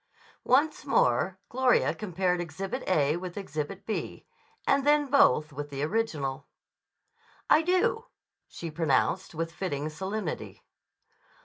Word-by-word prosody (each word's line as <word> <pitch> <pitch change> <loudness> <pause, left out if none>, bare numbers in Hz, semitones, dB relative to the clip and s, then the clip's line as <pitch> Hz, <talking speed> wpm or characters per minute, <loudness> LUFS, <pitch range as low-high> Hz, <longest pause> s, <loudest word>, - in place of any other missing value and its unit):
Once 295 +5 +3
more 185 - +2
Gloria 255 0 +2
compared 180 -3 -1
Exhibit 190 - -4
A 155 -3 +2
with 180 0 -7
Exhibit 185 +1 -5
B, 220 - -4 0.4
and 275 - +3
then 295 +1 +4
both 155 - +4
with 145 +1 -5
the 140 0 -4
original. 155 -8 -2 1.0
"I 300 - +7
do," 370 +6 +1 0.4
she 165 -2 -7
pronounced 155 - 0
with 165 +1 -2
fitting 150 -5 -3
solemnity. 190 +3 -5
180 Hz, 115 wpm, -28 LUFS, 150-225 Hz, 1.0 s, I